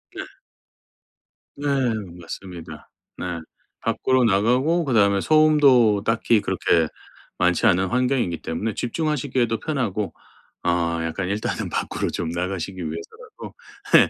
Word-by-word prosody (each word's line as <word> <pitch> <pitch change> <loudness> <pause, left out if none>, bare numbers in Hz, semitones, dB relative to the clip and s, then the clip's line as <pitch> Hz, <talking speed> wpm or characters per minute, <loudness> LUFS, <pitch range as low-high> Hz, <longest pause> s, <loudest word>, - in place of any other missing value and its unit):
네. - - -4 1.3
네 145 - -7 0.6
맞습니다. 85 0 -9 0.3
네. - - -5 0.6
밖으로 130 -1 +1
나가고 125 - +2
그다음에 100 -6 +3
소음도 140 -9 +5
딱히 115 -1 +2
그렇게 90 -4 +1 0.5
많지 90 -1 +2
않은 95 +2 +4
환경이기 125 -7 0
때문에 105 +7 -3
집중하시기에도 125 - -1
편하고 115 - -2 0.5
어 85 -1 +1
약간 90 +3 -3
일단은 105 +2 -2
밖으로 - - -2
좀 85 - -3
나가시기 90 +2 -3
위해서라도 85 -1 -8 0.4
예 - - +7
105 Hz, 280 characters per minute, -23 LUFS, 90-125 Hz, 1.3 s, 예